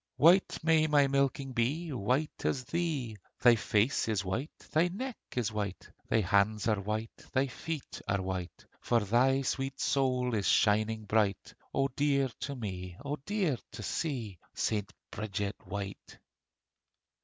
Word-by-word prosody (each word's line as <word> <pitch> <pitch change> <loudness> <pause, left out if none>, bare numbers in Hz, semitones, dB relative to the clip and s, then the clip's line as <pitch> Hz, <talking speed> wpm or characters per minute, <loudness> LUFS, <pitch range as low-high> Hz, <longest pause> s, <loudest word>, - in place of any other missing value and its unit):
White 175 +5 +5
may 160 -1 +4
my 145 -2 +5
milking 140 0 +1
be, 145 +7 0
White 130 +7 -1
as 130 - 0
thee: 145 -9 -2 0.2
Thy 120 -1 +8
face 110 +4 +1
is 105 -3 0
white, 115 - -3
thy 160 +3 +4
neck 240 +8 -4 0.2
is 120 -3 0
white, 100 -3 -4 0.2
Thy 110 - +3
hands 100 +2 +2
are 110 -3 +2
white, 110 +3 -3 0.2
thy 130 +1 +3
feet 150 +3 -6
are 100 - +1
white, 95 -2 -5
For 120 -1 +2
thy 130 +6 +3
sweet 135 +1 -2
soul 125 -3 +1
is 105 -3 0
shining 110 +1 +3
bright 105 -2 +1 0.2
O 135 0 +2
dear 140 -1 +1
to 140 - -4
me, 90 -6 -5
O 145 +1 -2
dear 190 - +1
to - - -7
see, 120 - -3 0.2
St. 105 -2 -1 0.2
Bridget 105 -1 -3
white! 100 0 -6
120 Hz, 145 wpm, -31 LUFS, 105-140 Hz, 0.2 s, Thy